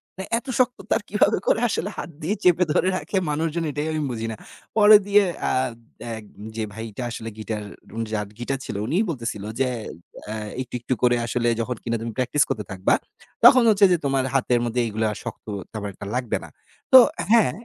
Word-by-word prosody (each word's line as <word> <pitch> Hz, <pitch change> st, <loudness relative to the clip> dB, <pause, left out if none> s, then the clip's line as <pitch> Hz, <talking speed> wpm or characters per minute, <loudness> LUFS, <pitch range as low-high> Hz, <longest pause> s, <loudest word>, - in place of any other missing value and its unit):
মানে, 190 Hz, -, -6 dB
এত 250 Hz, +4 st, -7 dB
শক্ত 250 Hz, 0 st, +2 dB
তার -, -, +3 dB
কীভাবে -, -, +3 dB
করে -, -, +3 dB, 0.4 s
হাত -, -, -5 dB
দিয়ে 180 Hz, +8 st, -1 dB
চেপে 180 Hz, 0 st, +5 dB
ধরে 185 Hz, -, +2 dB
রাখে 170 Hz, +5 st, -3 dB
মানুষজন, 160 Hz, +2 st, -1 dB
এটাই 150 Hz, +2 st, -3 dB
আমি 155 Hz, -, -1 dB
বুঝি 115 Hz, -1 st, -3 dB
না। -, -, -5 dB, 0.4 s
পরে 210 Hz, 0 st, +9 dB
দিয়ে 205 Hz, 0 st, +5 dB, 0.3 s
আদ 130 Hz, -3 st, -1 dB, 0.4 s
এক 110 Hz, -, -9 dB, 0.3 s
যে, 110 Hz, -, -2 dB
ভাইটা 110 Hz, +2 st, -6 dB
আসলে 115 Hz, -1 st, -5 dB
গিটার, 110 Hz, -1 st, -4 dB, 0.5 s
যার 105 Hz, -1 st, -1 dB
গিটার 130 Hz, +2 st, -2 dB
ছিল, -, -, -5 dB
উনিই 170 Hz, -, +1 dB
বলতেছিল 115 Hz, -8 st, -4 dB, 0.2 s
যে, 135 Hz, -, +3 dB, 0.6 s
আ -, -, -2 dB, 0.3 s
"একটু, 130 Hz, -, -9 dB
একটু 120 Hz, +2 st, -2 dB
করে 120 Hz, 0 st, +5 dB
আসলে 120 Hz, +1 st, -1 dB
যখন 125 Hz, +2 st, -2 dB
কিনা 115 Hz, 0 st, -1 dB
তুমি 115 Hz, 0 st, -4 dB
প্র্যাকটিস 130 Hz, +3 st, +2 dB
করতে 105 Hz, -, -2 dB
থাকবা, 95 Hz, -1 st, +1 dB, 0.5 s
তখন 255 Hz, -2 st, +9 dB
হচ্ছে 205 Hz, -2 st, +6 dB
যে, 175 Hz, -, +4 dB
তোমার 135 Hz, -1 st, +1 dB
হাতের 125 Hz, -2 st, +2 dB
মধ্যে 120 Hz, +1 st, 0 dB
এগুলো 110 Hz, 0 st, -1 dB
আর 105 Hz, -, -6 dB
শক্ত 115 Hz, -, -7 dB, 0.3 s
তেমন 105 Hz, -2 st, -5 dB
একটা 100 Hz, -, -9 dB
লাগবে 125 Hz, -3 st, -1 dB
না।" -, -, -10 dB, 0.4 s
তো -, -, +13 dB, 0.4 s
হ্যাঁ, 230 Hz, -3 st, +5 dB
125 Hz, 190 wpm, -23 LUFS, 115-170 Hz, 0.6 s, তো